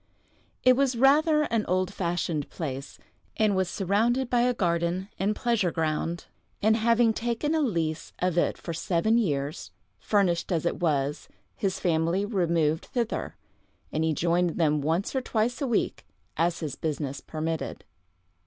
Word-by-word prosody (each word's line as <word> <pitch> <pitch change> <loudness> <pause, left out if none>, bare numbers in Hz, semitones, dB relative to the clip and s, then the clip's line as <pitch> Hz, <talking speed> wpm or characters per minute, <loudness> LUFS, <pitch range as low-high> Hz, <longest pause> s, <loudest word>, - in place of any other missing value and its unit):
It 255 0 +6
was 265 -1 +2
rather 300 +4 +4
an 230 -6 0
old 185 +1 0
fashioned 170 -5 -2
place, 140 -4 -5 0.4
and 215 -2 +3
was 190 -1 +1
surrounded 225 +8 +1
by 245 -1 +3
a 250 +1 +3
garden 170 +1 0
and 205 +2 +1
pleasure 230 -7 +1
ground; 165 +1 -2 0.3
and 220 +1 +3
having 230 0 +3
taken 240 +7 -1
a 320 - +2
lease 165 - -1
of 180 -1 0
it 175 - +1
for 170 - -6
seven 180 +7 +1
years, 145 -8 -2 0.3
furnished 190 -4 +1
as 170 -2 0
it - - -1
was, 150 -3 -1 0.3
his 195 -1 -1
family 170 +3 +1
removed 170 -6 +1
thither, 240 -4 -2 0.6
and 155 - 0
he 160 - +2
joined 170 +2 +1
them 150 -3 +2
once 165 - -1
or 265 - +1
twice 245 +2 -1
a 275 - 0
week, 240 - 0 0.3
as 170 +1 0
his 150 -4 -3
business 145 -3 -3
permitted. 160 0 -4
180 Hz, 155 wpm, -27 LUFS, 160-230 Hz, 0.6 s, It